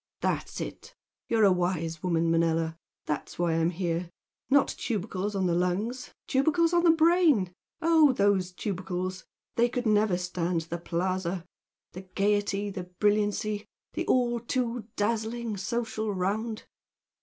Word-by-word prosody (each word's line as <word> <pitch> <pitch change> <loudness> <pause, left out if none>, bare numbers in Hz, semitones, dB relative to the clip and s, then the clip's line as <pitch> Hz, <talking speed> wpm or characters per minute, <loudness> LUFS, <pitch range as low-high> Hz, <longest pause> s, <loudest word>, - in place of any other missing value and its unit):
"That's - - -1
it! - - -7 0.3
You're 225 -2 +3
a 200 - +7
wise 175 -3 -1
woman, 170 -2 +1
Manella! 165 -1 +1 0.3
That's 150 - -4
why 175 -1 +1
I'm 165 +1 +2
here. 170 -1 -2 0.4
Not 280 0 +5
tubercles 205 -2 -3
on 190 -1 +1
the 175 - +2
lungs, 190 +9 -1 0.2
tubercles 315 +5 +2
on 345 0 +4
the 345 - +6
brain! 320 - +4 0.3
Oh, 320 -3 +6
those 200 -5 +2
tubercles! 185 -1 -4 0.3
They 240 +1 +4
could 245 0 -3
never 210 -3 +3
stand 175 -1 -1
the 170 +1 -5
Plaza! 180 +1 -2 0.5
the 185 - -8
gaiety, 200 +1 0
the 185 -2 -5
brilliancy 205 +2 0 0.3
the - - -3
the - - -18
all 240 -2 +2
too 240 -1 -2
dazzling 225 +1 -1
social 220 +1 -2
round!..." 210 +4 -2
200 Hz, 140 wpm, -28 LUFS, 180-230 Hz, 0.5 s, a